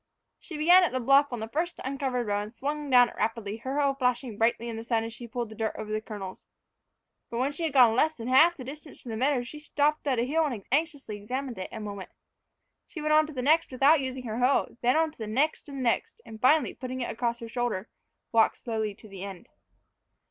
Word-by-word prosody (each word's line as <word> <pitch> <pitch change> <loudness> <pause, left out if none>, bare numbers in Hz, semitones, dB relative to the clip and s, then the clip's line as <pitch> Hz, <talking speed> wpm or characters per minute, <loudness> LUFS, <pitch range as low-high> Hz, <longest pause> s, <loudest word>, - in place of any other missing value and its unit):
She 320 - -8
began 350 +5 +7
at 350 - 0
the 255 - 0
bluff 275 +3 +4
on 240 -2 -4
the 220 - -4
first 335 +8 -2
uncovered 265 -2 -2
row, 205 -1 0
and 210 +3 -8
swung 295 +2 -3
down 245 -2 +6
it - - -13
rapidly, 220 -2 -2
her 265 +5 -3
hoe 280 -1 +2
flashing 250 -3 -1
brightly 230 +2 +1
in 230 - -4
the 225 - -6
sun 230 -1 0
as 225 0 -6
she 240 0 -9
pulled 240 -1 -4
the 220 - -10
dirt 220 0 -2
over 215 -1 -6
the 215 0 -1
kernels. 200 -4 -8 0.8
But 235 - -4
when 260 +3 +1
she 325 +3 -3
had 310 - -2
gone 245 -5 +6
less 315 +5 +2
than 230 0 -6
half 315 +7 +5
the 260 - -7
distance 290 +3 -10
to 245 - -9
the 225 - -3
meadow 260 +2 +1
she 300 +5 -9
stopped 300 0 0
at 260 -3 +2
a 230 - +2
hill 310 +6 +1
and 230 -8 -5
anxiously 285 -7 -1
examined 250 +3 -5
it 185 - -5
a 225 - -6
moment. 200 -3 -7 0.8
She 335 - -8
went 305 0 +1
on 310 0 +5
to 310 - -9
the 255 -2 -3
next 315 +4 +3
without 275 +4 +4
using 260 -1 -4
her 225 -1 -4
hoe, 255 +3 +2
then 245 +1 +3
on 320 -1 +2
to - - -25
the 220 - -4
next 280 +7 0
and 280 - -7
the 260 - -3
next; 350 - 0
and, 220 -1 -11
finally, 275 0 +4
putting 255 0 -6
it 240 - -2
across 235 0 -1
her 230 - -8
shoulder, 230 -4 -2 0.4
walked 225 -1 +3
slowly 220 -3 -3
to 215 - -15
the 195 -2 -9
end. 195 -3 -9
250 Hz, 250 wpm, -28 LUFS, 225-285 Hz, 0.8 s, began